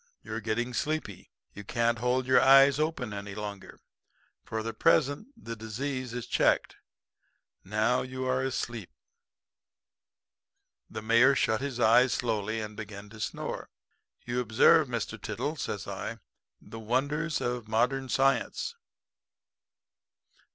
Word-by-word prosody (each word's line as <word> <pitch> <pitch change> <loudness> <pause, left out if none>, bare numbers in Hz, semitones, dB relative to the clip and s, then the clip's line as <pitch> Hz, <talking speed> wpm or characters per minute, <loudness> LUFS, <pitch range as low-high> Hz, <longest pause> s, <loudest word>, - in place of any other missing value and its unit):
You're 110 +1 -5
getting 120 +3 -2
sleepy. 135 - -3 0.2
You 105 - -9
can't 115 +2 0
hold 125 +2 +1
your 130 0 +5
eyes 135 +1 +7
open 155 -8 -1
any 100 0 -6
longer. 105 -2 -7 0.6
For 110 0 -4
the 115 0 -4
present 145 - +2
the 115 0 -7
disease 125 +3 -4
is 125 -1 -5
checked. - - +1 0.9
Now, 110 +5 +1
you 130 0 -5
are 130 0 +1
asleep.' 120 -5 -3 2.0
"The - - -7
Mayor 115 +5 +5
shut 110 -3 +1
his 135 -3 -4
eyes 120 +2 +5
slowly 110 -2 -1
and 105 -1 -6
began 105 -1 -8
to 110 0 -13
snore. - - -4 0.6
"'You 120 +1 -1
observe, 130 +7 +5
Mr. 120 -3 -4
Tiddle,' - - -3
says - - -4
I, - - -5 0.4
'the 115 - -10
wonders 145 +8 -1
of 120 -2 -3
modern 125 +4 0
science.' 135 - +1
120 Hz, 125 wpm, -29 LUFS, 110-130 Hz, 2.0 s, eyes